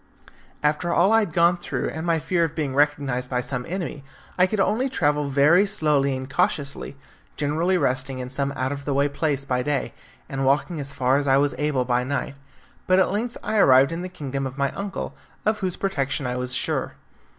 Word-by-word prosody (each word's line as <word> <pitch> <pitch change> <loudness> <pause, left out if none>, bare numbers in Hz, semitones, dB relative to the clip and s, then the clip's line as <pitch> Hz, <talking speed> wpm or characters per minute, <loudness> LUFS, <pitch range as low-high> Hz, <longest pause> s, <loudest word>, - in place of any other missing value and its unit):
After 150 +4 +1
all 180 +5 +4
I 225 - +6
had 210 -6 -1
gone 170 +2 +3
through, - - -3
and 160 +2 -5
my 165 -1 +3
fear 170 +2 0
of 165 -2 -2
being 145 -4 -2
recognised 140 -3 +1
by 125 - 0
some 125 0 -4
enemy, 170 -5 -4 0.3
I 180 0 +4
could 215 +2 -2
only 230 +7 +1
travel 150 - 0
very 150 +8 +4
slowly 145 -8 +2
and 130 0 -6
cautiously, 140 -2 -1 0.4
generally 160 +6 +1
resting 135 -3 -1
in 125 -1 -5
some 140 +2 -1
out 130 0 -2
of 140 -1 -6
the 140 - -1
way 140 +1 +3
place 145 -1 -1
by 125 -2 0
day, 145 +1 -2 0.3
and 135 0 -3
walking 145 +5 +1
as 140 -1 -5
far 130 -1 +2
as 145 0 -1
I 135 0 +5
was 140 -1 +2
able 145 -4 0
by 125 0 +1
night, 140 +1 -3 0.5
but 185 - +4
at 190 - +3
length 230 +4 -2
I 215 0 0
arrived 135 -3 +6
in 165 +1 -3
the 185 - -5
kingdom 135 -5 -4
of 130 +1 -9
my 140 -1 0
uncle, 200 -1 -5 0.3
of 215 0 +1
whose 185 -3 -2
protection 145 -7 -1
I 125 0 -2
was 125 0 -3
sure. - - -1
145 Hz, 210 wpm, -24 LUFS, 135-175 Hz, 0.5 s, I